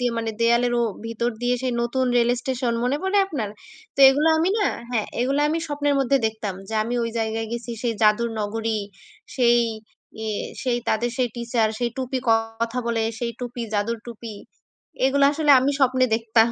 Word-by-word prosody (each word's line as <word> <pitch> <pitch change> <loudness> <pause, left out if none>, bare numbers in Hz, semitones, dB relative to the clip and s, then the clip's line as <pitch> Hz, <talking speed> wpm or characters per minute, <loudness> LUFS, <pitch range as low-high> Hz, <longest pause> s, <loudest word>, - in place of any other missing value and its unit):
দিয়ে 245 -1 0
মানে 225 -1 -2
দেয়ালেরও 240 +1 +3 0.2
ভিতর 235 +1 -1
দিয়ে 245 +1 +2
সেই 255 -1 0
নতুন 255 +2 0
রেল 240 0 +3
স্টেশন। 255 -2 -1
মনে 265 +3 +1
পড়ে 385 +2 +2
আপনার? 250 - -3 0.4
তো - - -22
এগুলা 300 +4 +3
আমি 335 +3 +2
না, 405 - +2 0.2
হ্যাঁ, 225 -4 0
এগুলা 275 +3 +1
আমি 325 +2 0
স্বপ্নের 290 -1 0
মধ্যে 270 +1 +3
দেখতাম 215 -3 -4
যে 220 - -5
আমি 235 +3 -3
ঐ - - 0
জায়গায় 225 0 -2
গেছি, 235 0 -5
সেই 235 -2 0
জাদুর 215 +2 +3
নগরী, 220 +1 -2 0.6
সেই 240 -1 +4 0.7
ই - - -3 0.4
সেই 245 -2 0
তাদের 235 +2 +1
সেই 250 -2 +1
টিচার, 235 -2 0
সেই 240 -1 -1
টুপি 260 0 -2
কথা 225 +2 0
বলে, 230 -1 0 0.2
সেই 235 -1 -2
টুপি 245 -1 -5
জাদুর 225 +3 0
টুপি। 230 -2 -8 0.7
এগুলা 280 +1 +4
আসলে 300 -1 +1
আমি 275 +2 +2
স্বপ্নে 255 -1 +4
দেখতাম 225 0 +3
240 Hz, 180 wpm, -23 LUFS, 225-260 Hz, 0.7 s, সেই